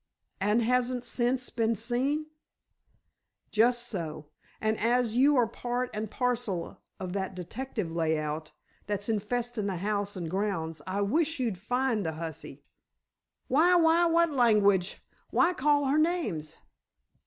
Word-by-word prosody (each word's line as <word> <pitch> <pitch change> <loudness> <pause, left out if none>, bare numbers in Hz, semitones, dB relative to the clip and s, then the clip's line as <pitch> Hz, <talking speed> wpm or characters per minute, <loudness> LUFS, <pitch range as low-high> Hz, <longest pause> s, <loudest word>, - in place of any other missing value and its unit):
"And 210 +4 +2
hasn't 250 +1 +1
sence 250 +1 0
ben 230 -1 +1
sane?" 255 +7 0 1.3
"Just 240 +2 +3
so. 155 -7 -5 0.3
And 220 0 0
as 235 0 +1
you 280 +4 +5
are 245 -3 +4
part 245 +2 -3
and 215 0 -3
parcel 240 -8 -2 0.2
of 185 -1 -5
that 190 -1 -3
detective 205 +1 -5
layout 155 -2 -1 0.4
that's 205 -1 -2
infestin' 225 +1 -1
the 195 - -2
house 200 +2 -2
an' 175 - -4
grounds, 165 -4 -2
I 195 +2 -1
wish 310 +9 +1
you'd 225 -8 -1
find 245 +1 0
the 160 -2 -2
hussy." 160 0 -7 0.8
"Why, 335 +7 +4
why, 335 0 +5
what 335 0 +3
langwitch! 210 -8 +3 0.3
Why 355 +1 +3
call 290 -1 +2
her 280 +3 +2
names?" 310 - -1
225 Hz, 130 wpm, -29 LUFS, 190-255 Hz, 1.3 s, you